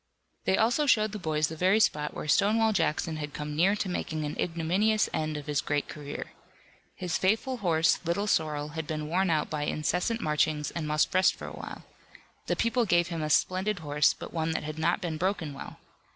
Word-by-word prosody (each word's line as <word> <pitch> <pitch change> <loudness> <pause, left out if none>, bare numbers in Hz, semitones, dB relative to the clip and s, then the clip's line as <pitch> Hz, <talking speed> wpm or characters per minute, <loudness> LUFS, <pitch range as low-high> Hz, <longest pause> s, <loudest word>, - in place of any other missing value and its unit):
They 190 - +3
also 245 +7 +2
showed 215 -4 +4
the 210 - -5
boys 155 -3 0
the 160 - -7
very 185 +6 +3
spot 150 -8 +1
where - - -5
Stonewall 220 +7 +3
Jackson 160 -2 0
had 150 -1 -6
come 150 0 -4
near 185 +6 +3
to 205 - -2
making 155 -4 -3
an 145 - -4
ignominious 180 +6 +1
end 155 -1 -1
of 145 - -7
his 150 -2 0
great 145 -1 -1
career. 145 -1 -7 0.6
His 180 -3 -2
faithful 225 +7 +1
horse, 165 -6 +2
Little 175 +4 0
Sorrel, 150 -6 0
had 160 0 -5
been 155 -1 -3
worn 185 +4 +1
out 155 -2 0
by 150 -1 -1
incessant 180 +10 -1
marchings 150 -3 0
and 160 -3 -4
must 150 0 +1
rest 185 +1 +4
for - - -9
a - - -7
while. - - -8 0.6
The - - +1
people 230 +1 +1
gave 175 -3 +2
him 165 -2 -3
a 155 - -2
splendid 190 +6 +1
horse, 150 -2 +2
but - - -9
one 160 -1 -1
that - - -2
had 155 +1 -6
not 170 +5 +1
been 165 -4 -3
broken 175 -4 -1
well. 140 - -9
165 Hz, 210 wpm, -28 LUFS, 150-195 Hz, 0.6 s, showed